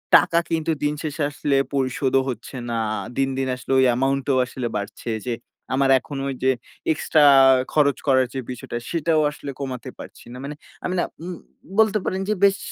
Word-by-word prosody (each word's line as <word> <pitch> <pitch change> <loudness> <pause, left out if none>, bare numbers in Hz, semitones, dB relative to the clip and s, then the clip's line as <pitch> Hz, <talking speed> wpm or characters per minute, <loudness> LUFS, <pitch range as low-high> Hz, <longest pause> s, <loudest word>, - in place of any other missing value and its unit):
টাকা 170 - +5
কিন্তু 165 0 0
দিন 145 0 +2
শেষে 150 -1 -2
আসলে 145 -1 0 0.2
পরিশোধও 135 0 +1
হচ্ছে 120 +2 -6
না। 115 - -1 0.4
দিন, 135 0 +2
দিন 135 -1 0
আসলে 125 +1 -7
ওই 130 - +5
amount 135 +1 0
ও - - +2
আসলে 125 -1 -4
বাড়ছে 100 +3 -5 0.2
যে 120 - 0 0.4
আমার 135 0 +2
এখন 140 +3 -8
ওই 135 - -2
যে 130 - +5 0.4
extra 150 0 +2 0.5
খরচ 145 -3 +3
করার 130 -1 +4
যে 135 - -3
বিষয়টা, 120 -1 -6
সেটাও 165 -1 +1
আসলে 145 -1 -7
কমাতে 130 -3 -5
পারছি - - -11
না। - - -8
মানে 145 +1 -5 0.3
আমি 180 - -1
না - - +2 0.2
উম 180 0 -5 0.4
বলতে 215 -1 +5
পারেন 190 +1 -1
যে - - +3
বেশ 200 0 +5
140 Hz, 185 wpm, -23 LUFS, 130-155 Hz, 0.5 s, টাকা